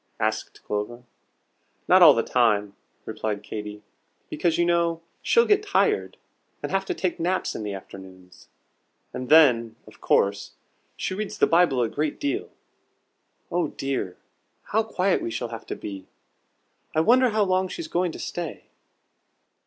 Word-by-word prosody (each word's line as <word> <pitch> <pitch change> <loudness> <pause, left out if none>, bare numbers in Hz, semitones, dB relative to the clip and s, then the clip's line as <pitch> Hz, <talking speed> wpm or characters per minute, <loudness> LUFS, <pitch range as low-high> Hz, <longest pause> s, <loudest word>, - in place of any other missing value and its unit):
asked - - -2
Clover. 105 +4 -4 0.8
"Not 185 +1 +6
all 155 -5 +9
the 115 - +1
time," 105 -5 +1 0.3
replied 110 -1 -4
Katy, 105 0 -7 0.5
"because 165 +1 0
you 170 - +3
know 170 -1 +1 0.2
she'll 465 0 +4
get 415 0 +3
tired, 425 +1 0 0.5
and - - -3
have 195 0 0
to - - -3
take 185 -2 -2
naps 180 +3 -1
in - - -5
the 105 -2 -4
afternoons. 95 -1 -13 0.7
And 125 0 -5
then, 120 -8 +5
of - - -17
course, 100 +1 +1 0.4
she - - -3
reads 210 +2 -4
the - - +5
Bible 165 -7 +3
a - - +1
great 150 +5 -3
deal. 300 +7 -2 1.0
Oh 175 -2 +1
dear, 135 -11 -4 0.5
how 220 - +1
quiet 195 -4 0
we - - -3
shall 120 +1 -4
have 115 -1 -8
to - - -4
be! 95 -2 -8 0.9
I - - +3
wonder 250 +7 +5
how 215 -1 +2
long 185 -1 +1
she's 330 - -6
going 180 - 0
to - - -7
stay?" 175 -3 -6
155 Hz, 155 wpm, -25 LUFS, -, 1.0 s, all